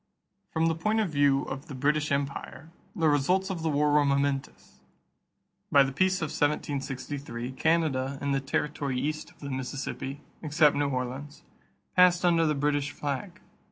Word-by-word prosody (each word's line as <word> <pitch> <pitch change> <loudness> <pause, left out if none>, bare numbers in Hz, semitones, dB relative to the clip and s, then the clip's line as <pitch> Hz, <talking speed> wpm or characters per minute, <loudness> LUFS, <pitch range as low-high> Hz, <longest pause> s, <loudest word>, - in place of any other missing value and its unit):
From 160 0 +1
the 165 - +3
point 215 +7 0
of 205 -6 0
view 140 -2 +3
of 135 +1 -6
the 140 - -7
British 150 +3 +1
empire, 140 +3 -3 0.2
the 165 -5 +2
results 180 +7 +2
of 175 -3 -4
the 160 - 0
war 150 0 +2
were 150 0 +5
momentous. 140 -1 -1 0.9
By 140 -1 +7
the 135 - -2
peace 185 +5 +1
of 155 - -2
1763, 135 -3 -2
Canada 140 -2 +1
and 140 0 -1
the 135 - +1
territory 140 -1 -2
east 155 +3 -3
of - - -22
the 140 -1 -5
Mississippi, 135 +1 -4 0.2
except 150 -1 +3
New 145 0 +1
Orleans, 130 +3 -4 0.5
passed 180 -1 +5
under 165 -2 +4
the 150 - +1
British 145 0 0
flag. 150 +7 -5
145 Hz, 160 wpm, -28 LUFS, 140-160 Hz, 0.9 s, By